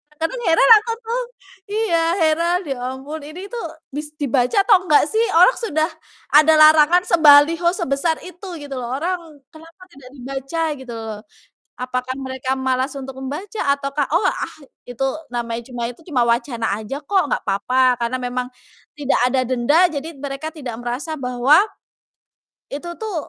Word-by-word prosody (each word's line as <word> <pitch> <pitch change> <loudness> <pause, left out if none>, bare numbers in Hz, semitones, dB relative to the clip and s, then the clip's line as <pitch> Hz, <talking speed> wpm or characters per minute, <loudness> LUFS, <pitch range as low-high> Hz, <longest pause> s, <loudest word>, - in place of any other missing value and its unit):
Kadang 325 +11 -3
heran 330 +8 +4
aku 460 +2 -5
tuh, 470 +3 -2 0.5
iya 415 -4 0 0.2
heran 335 +3 +2
ya 270 - -2 0.2
ampun, 290 +4 -7
ini 360 +6 -9
tuh 475 -1 -5 0.3
bis 300 +2 -6
dibaca 260 - +2
atau 405 -2 +6
enggak 300 - +5
sih 440 - +1 0.2
orang 365 +9 +6
sudah 315 -7 0 0.5
ada 310 +1 +6
larangan 310 +3 +6
sebaliho 325 0 +5
sebesar 320 -2 0
itu 365 +2 -11
gitu 275 -3 -6
loh, 245 +1 -4
orang 355 +5 -1 0.3
kenapa 330 +3 -16
tidak 270 -4 -14
dibaca 270 +5 -5 0.2
gitu 250 -3 -9
loh. 220 -2 -6 0.6
Apakah 255 0 -3
mereka 260 0 -4
malas 260 +1 -1
untuk 270 -1 -7
membaca 330 +11 -6
ataukah, 280 0 -2
"Oh, 355 - +3
ah - - -4 0.3
itu 245 +2 -6 0.3
namanya 235 0 -3
cuma 240 -1 -5
itu, 245 - -13
cuma 260 -8 +1
wacana 235 -3 0
aja 270 +7 -6
kok, 380 +5 +2
nggak - - -2
apa-apa," 250 +6 +2
karena 235 +2 -1
memang 250 0 -3 0.5
tidak 290 -2 0
ada 260 +1 +1
denda 290 +8 +3
jadi 300 +1 -5
t - - -18
mereka 285 +3 -5
tidak 250 -7 -6
merasa 255 +7 -4
bahwa 250 +3 +3 1.2
itu 290 +5 -6
tuh, 430 -4 -4
285 Hz, 155 wpm, -20 LUFS, 255-330 Hz, 1.2 s, atau